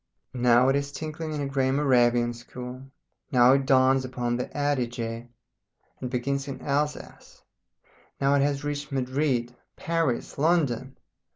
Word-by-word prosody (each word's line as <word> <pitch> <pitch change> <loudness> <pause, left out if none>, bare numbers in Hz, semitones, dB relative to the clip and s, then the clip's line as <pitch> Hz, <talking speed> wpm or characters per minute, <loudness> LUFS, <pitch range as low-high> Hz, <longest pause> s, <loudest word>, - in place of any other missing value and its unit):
Now 125 0 +4
it 135 - +3
is 140 0 -2
tinkling 155 +2 -5
in 150 -1 -3
a 140 - -2
grey 135 -1 0
Moravian 120 -4 +3
school, 125 +2 -9 0.4
now 125 0 +6
it 135 -1 +1
dawns 130 0 +4
upon 125 -2 -2
the 125 - -3
Adige 120 -5 -2 0.7
and 125 - -3
begins 135 +3 -2
in 135 - -6
Alsace, 150 +1 -4 0.8
now 140 +1 +3
it 140 - +3
has 140 0 0
reached 145 0 -4
Madrid, 130 -2 -1 0.2
Paris, 165 -9 -2
London. 140 -5 +1
135 Hz, 135 wpm, -26 LUFS, 125-145 Hz, 0.8 s, now